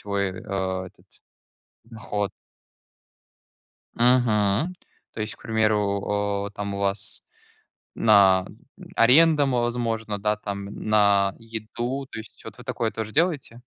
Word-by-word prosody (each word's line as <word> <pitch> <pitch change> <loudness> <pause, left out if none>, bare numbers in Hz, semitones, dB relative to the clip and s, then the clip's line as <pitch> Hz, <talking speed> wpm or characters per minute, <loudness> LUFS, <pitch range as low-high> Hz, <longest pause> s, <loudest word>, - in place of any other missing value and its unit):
свой, 100 -2 -2
а, 95 -1 -3
этот - - -18 0.8
доход. 110 -3 -4 1.7
Мгм, 120 - +2 0.4
то 110 - -5
есть, 105 0 -4
к - - -25
примеру, 100 -2 0
э, - - -8
там 100 -1 -4
у 100 - -4
вас 100 0 -2 0.7
на 95 -4 +5 0.5
аренду, 145 +5 +6
возможно, 120 -4 -1
да, 105 +1 0
там 100 -1 -5
на 100 -2 +2
еду. 115 +4 -5
То - - -7
есть 110 - -11
вот 110 -2 -9
вы 125 - -11
такое 120 -3 -2
тоже 110 -1 -5
делаете? 150 -8 0
105 Hz, 120 wpm, -24 LUFS, 100-120 Hz, 1.7 s, аренду